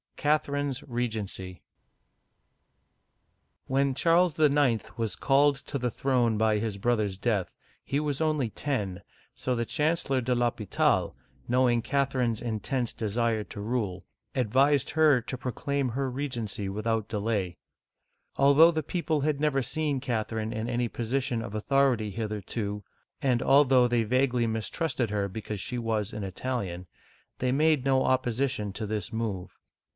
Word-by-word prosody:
CATHERINE'S 145 -2 0
REGENCY 110 -7 -4 2.0
WHEN 135 0 +1
Charles 170 +2 +3
IX. 145 -6 +2
was 110 -5 -1
called 140 +5 +3
to 140 +1 -5
the 125 0 0
throne 120 -3 +1
by 110 0 +3
his 105 -1 -2
brother's 105 -3 0
death, 105 -3 0 0.3
he 140 - -1
was 150 -1 -2
only 155 -6 +1
ten, 100 -11 -3 0.3
so 125 - -2
the 115 0 -1
Chancellor 150 -2 0
deL'Hopital, 120 -4 +1 0.3
knowing 120 -1 +3
Catherine's 130 -4 0
intense 120 +2 -2
desire 110 0 0
to 100 - -8
rule, 105 -5 -2 0.3
ad 125 -6 0
vised 140 +2 +3
her 155 -5 +4
to 125 +2 -5
proclaim 130 +2 -2
her 135 +3 -2
regency 120 -7 -3
without 110 +1 -1
delay. 105 -5 -2 0.8
Although 140 +4 +7
the 160 -2 -2
people 160 -2 -1
had 150 0 0
never 145 -3 +1
seen 145 +2 -1
Catherine 110 -3 -2
in 110 +2 -3
any 120 0 0
position 120 +1 -2
of 110 -2 -7
authority 125 -1 +2
hitherto, 105 -1 -4 0.4
and 125 -3 +2
although 135 -3 +5
they 120 -1 +2
vaguely 125 +1 +2
mistrusted 115 - -1
her 100 -1 -1
because 105 +1 -6
she 125 - -4
was 110 -2 -1
an 105 -1 -4
Italian, 95 -3 -4 0.5
they 125 0 0
made 150 0 +3
no 135 -1 +3
opposition 130 -4 0
to 110 +2 -4
this 105 -4 -3
move. 100 -5 -4
120 Hz, 135 wpm, -28 LUFS, 110-140 Hz, 2.0 s, Although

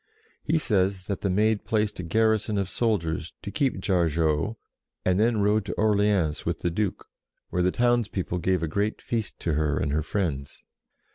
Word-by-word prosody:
He 160 +2 +2
says 95 - +1
that 100 0 -3
the 100 - 0
Maid 105 +3 +2
placed 105 -3 0
a - - -3
garrison 110 +3 +1
of 100 -2 -1
soldiers 85 -8 -1
to 100 - -5
keep 135 +1 0
Jar 90 -4 +2
geau, 80 +6 0 0.5
and 90 +1 +2
then 110 -1 +3
rode 105 +1 +3
to - - -3
Orleans 100 -7 +2
with 85 -1 -2
the 85 - 0
Duke, 105 +3 -2 0.5
where 90 - +1
the 90 - +3
townspeople 110 -6 0
gave 90 -1 +1
a - - 0
great 100 +7 -1
feast 115 -3 -3
to 85 - 0
her 75 0 +1
and 75 - 0
her 75 +2 +1
friends. 80 -5 -3
100 Hz, 185 wpm, -26 LUFS, 85-110 Hz, 0.5 s, then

